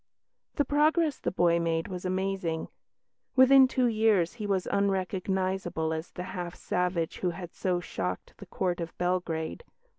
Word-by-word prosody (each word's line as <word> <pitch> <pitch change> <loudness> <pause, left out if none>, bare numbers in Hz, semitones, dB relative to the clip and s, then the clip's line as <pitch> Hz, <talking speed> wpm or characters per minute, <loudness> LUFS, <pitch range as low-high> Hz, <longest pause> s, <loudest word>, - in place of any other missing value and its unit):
The 290 - +2
progress 305 +2 +2
the - - -1
boy 170 -2 +2
made 165 0 0
was 185 -2 -6
amazing. 185 -3 -2 0.7
Within 265 0 +8
two 255 -1 +1
years 215 -6 +3
he 215 -3 -5
was 190 -2 0
unrecognisable 190 -3 0
as 160 +2 -4
the 180 - -6
half 175 -1 -5
savage 180 -2 -1
who 180 - 0
had 175 0 -7
so 180 -2 0
shocked 90 - -4
the - - -11
Court 180 -2 -1
of 165 -1 -6
Belgrade. 175 - -2
185 Hz, 150 wpm, -29 LUFS, 170-200 Hz, 0.7 s, Within